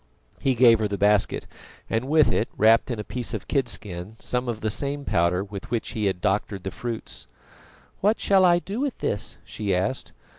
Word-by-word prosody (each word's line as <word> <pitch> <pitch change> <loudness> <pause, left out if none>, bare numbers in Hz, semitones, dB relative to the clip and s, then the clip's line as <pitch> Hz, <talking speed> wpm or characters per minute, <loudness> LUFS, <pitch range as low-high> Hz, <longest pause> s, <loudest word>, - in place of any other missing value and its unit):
He 135 -1 +1
gave 115 -2 +6
her 110 - +1
the 100 -1 -3
basket, 105 0 +2 0.4
and 115 +3 -1
with 155 +2 +4
it, 110 - 0
wrapped 115 +4 +5
in 120 - -2
a - - -3
piece 125 +2 -4
of - - -6
kidskin, 105 - -2
some 125 0 -2
of 110 -2 -4
the 110 - -1
same 140 +4 -3
powder 85 +2 +1
with 100 -1 -8
which 115 -1 -2
he 110 -2 -2
had 95 -2 -1
doctored 95 0 -1
the 95 - -4
fruits. 115 +1 -6 0.7
"What 210 +3 +2
shall 195 -1 +4
I 175 -1 +6
do 195 +6 -5
with 280 -2 -2
this?" 100 - -3
she 100 -3 -2
asked. 95 +8 -2
110 Hz, 195 wpm, -25 LUFS, 100-135 Hz, 0.7 s, gave